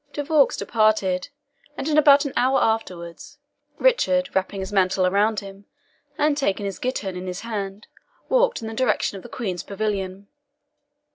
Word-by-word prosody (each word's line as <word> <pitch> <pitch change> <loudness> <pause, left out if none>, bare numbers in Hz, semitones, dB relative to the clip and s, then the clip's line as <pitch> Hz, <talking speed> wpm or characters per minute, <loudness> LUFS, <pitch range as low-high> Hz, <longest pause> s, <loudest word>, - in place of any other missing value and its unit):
De 290 - -3
Vaux 295 -2 +3
departed, 215 -3 +1 0.5
and 275 - -3
in 305 - +1
about 290 -1 +6
an 280 - -4
hour 265 +2 +3
afterwards, 180 -7 -3 0.4
Richard, 280 - +2
wrapping 190 +1 -1
his 190 +2 -6
mantle 185 -1 +2
around 205 +3 +2
him, 195 0 -12 0.5
and 300 -1 +2
taking 205 -8 -1
his 195 -3 -5
ghittern 210 -7 -3
in 180 +1 -6
his 180 +1 -5
hand, 205 -2 -5 0.4
walked - - +2
in - - -4
the 225 - -5
direction 255 -3 0
of - - -9
the 240 - -12
Queen's 190 -9 -4
pavilion. 200 -2 -4
210 Hz, 160 wpm, -23 LUFS, 190-270 Hz, 0.5 s, about